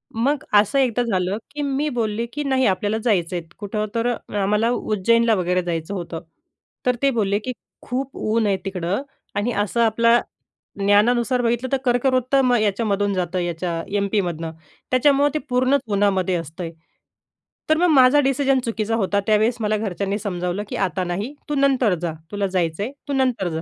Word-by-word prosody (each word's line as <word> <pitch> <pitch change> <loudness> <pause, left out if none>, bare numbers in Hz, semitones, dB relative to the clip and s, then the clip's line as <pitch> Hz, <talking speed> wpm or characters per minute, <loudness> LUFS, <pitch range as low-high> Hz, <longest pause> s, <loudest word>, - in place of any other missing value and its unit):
मग 270 +5 0
असं 210 +6 +4
एकदा 245 -2 +2
झालं, 190 -3 -1
की 295 +1 -5
मी 285 +1 0
बोलले, 230 -3 -1
की 295 - -2
नाही, 265 -2 +1
आपल्याला 205 +3 0
जायचंय 180 -6 +1 0.2
कुठं? 210 +1 -2
तर 230 +1 +1 0.3
आम्हाला 210 +4 +2
उज्जैनला 230 +1 +2
वगैरे 180 0 +1
जायचं 170 +1 -3
होतं. 170 -3 -5 0.6
तर 250 -1 +3
ते 275 - +4
बोलले, 205 -4 +1
की 255 +4 -4 0.3
"खूप 260 +2 -4
ऊन 220 0 0
आहे 195 -1 +2
तिकडं" 190 +3 -2 0.3
आणि 205 +4 0
असं 210 +2 0
आपल्या 230 +1 +4 0.6
ज्ञानानुसार 235 +5 +3
बघितलं, 240 +2 0
तर 270 - +3
कर्कवृत्त 255 +1 +2
मग 245 -1 +3
याच्यामधून 205 -1 0
जातं, 180 -1 -1
याच्या 170 -1 -2
एम-पीमधून. 180 -5 -1 0.4
त्याच्यामुळे 280 +3 +4
ते 305 - 0
पूर्ण 255 +2 +3
उन्हामध्ये 195 -3 +1
असतंय. 165 +1 -5 1.0
तर 315 - +4
मग 355 +2 +3
माझा 265 +1 +6
डिसिजन 270 0 +2
चुकीचा 225 -1 -1
होता. 200 -1 +1
त्यावेळेस 220 +3 +3
मला 215 0 +1
घरच्यांनी 200 -1 -2
समजावलं, 180 -1 -3
की - - -4
'आता 190 -1 -1
नाही, 195 +10 -3 0.2
तू 295 - 0
नंतर 270 -6 +3
जा, 170 -2 -2 0.2
तुला 200 -1 -1
जायचं 180 0 -1
आहे, 245 - -4 0.2
तू 285 - -2
नंतर 250 -9 +1
जा.' 160 0 -3
215 Hz, 165 wpm, -22 LUFS, 190-250 Hz, 1.0 s, माझा